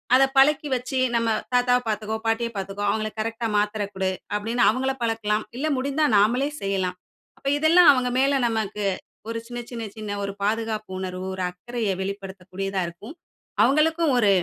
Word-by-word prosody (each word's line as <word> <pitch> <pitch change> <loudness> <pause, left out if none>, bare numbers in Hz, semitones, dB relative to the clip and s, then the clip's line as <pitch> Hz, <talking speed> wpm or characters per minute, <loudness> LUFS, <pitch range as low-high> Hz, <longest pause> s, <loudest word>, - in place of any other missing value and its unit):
அத 265 - +6
பழக்கி 295 +2 +5
வச்சு 255 +1 -3 0.2
நம்ம 230 0 +1 0.3
தாத்தாவ 245 0 +4
பாத்துக்கோ, 215 0 -2
பாட்டிய 230 +1 +1
பாத்துக்கோ. 195 +1 -4
அவுங்கள 215 0 0
கரெக்ட்டா 225 +1 -2
மாத்திரை 210 0 0
குடு 190 0 0 0.3
அப்டின்னு, 230 +3 0
அவுங்கள 265 +3 0
பழக்கலாம். 220 -2 0
இல்ல 305 +4 -1
முடிந்தா 280 +4 +1
நாமலே 245 +8 +3
செய்யலாம். 190 -2 -1 0.4
அப்ப 275 - -7
இதெல்லாம் 325 +2 +6
அவுங்க 250 -1 0
மேல 275 0 +3
நமக்கு 210 -2 -2 0.4
ஒரு 230 - -2
சின்ன, 240 0 -5
சின்ன, 230 -1 -5
சின்ன 210 -1 -5
ஒரு 200 0 -3
பாதுகாப்பு 215 -1 -1
உணர்வு 185 0 -4
ஒரு 185 - -3
அக்கறைய 225 +4 -4
வெளிப்படுத்தக்கூடியதா 195 0 -4
இருக்கும். 205 - -10 0.5
அவுங்களுக்கும் 315 +1 +3
ஒரு 210 -4 +4
225 Hz, 155 wpm, -24 LUFS, 200-255 Hz, 0.5 s, அத